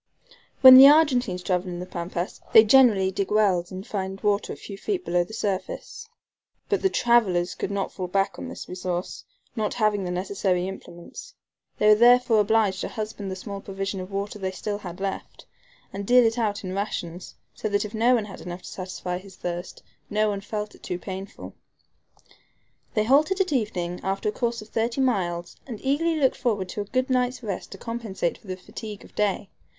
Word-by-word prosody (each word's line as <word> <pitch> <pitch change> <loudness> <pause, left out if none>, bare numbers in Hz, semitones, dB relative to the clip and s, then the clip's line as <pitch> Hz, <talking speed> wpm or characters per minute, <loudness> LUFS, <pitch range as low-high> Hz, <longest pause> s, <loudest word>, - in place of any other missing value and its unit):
When 260 -1 +12
the 270 +1 +11
Argentines 255 - +3
travel 180 0 -1
in 175 - -5
the 180 - -5
Pampas 175 0 -5
they 220 - +10
generally 215 -5 +5
dig 195 0 -2
wells, 195 -5 +2
and 190 +1 -7
find 195 -1 -4
water 205 -1 0
a - - -5
few 200 - -9
feet 365 - -3
below 175 0 +2
the 175 - -13
surface. 205 - -4 0.6
But 405 -1 +1
the 385 - +3
travelers 200 - +2
could - - -4
not 200 -1 -2
fall 185 -2 -5
back 195 0 0
on - - -6
this - - -8
resource, 180 0 -4 0.3
not 215 -3 -2
having 215 -3 +1
the 180 - -3
necessary 185 0 -1
implements. 190 - -10 0.4
They 210 - +2
were 215 - +9
therefore 240 0 +5
obliged 210 -2 +2
to - - -2
husband 215 -2 -5
the 190 - -4
small 200 +1 -7
provision 195 0 -4
of 185 0 -7
water 200 +1 -4
they 190 - -2
had 185 - -5
still 205 +1 -4 0.2
left, 195 0 -5 0.5
and 200 +1 -4
deal 245 +3 +5
it 225 +2 +1
out 210 -3 -1
in 185 -1 -4
rations, 180 -3 -4 0.2
so 215 - -4
that 205 +1 0
if 210 - -8
no 235 +3 +4
one 220 -3 -1
had 195 - -10
enough 175 +1 -7
to - - -8
satisfy 180 -1 -5
his 190 0 -14
thirst 175 0 -6 0.3
no 215 +1 +1
one 200 -1 -3
felt 210 +1 -5
it - - -18
too 180 - -4
painful. 190 +2 -8 1.4
They 215 - +3
halted 300 - +3
at 370 -5 +1
evening 180 -8 -2
after 195 +2 -1
a - - -1
course 235 -1 -2
of 215 - -18
thirty 230 +3 -1
miles 175 -9 -1
and 230 -5 -6
eagerly 320 +5 +1
looked 275 -4 +2
forward 205 -7 -1
to 210 - -4
a - - -5
good 255 +5 -1
night's 250 0 0
rest 200 -5 -5
to - - -9
compensate 225 -6 -3
for - - -20
the 185 0 -4
fatigue 210 +2 -9
of - - -18
day. 205 -1 -1
205 Hz, 200 wpm, -25 LUFS, 185-230 Hz, 1.4 s, When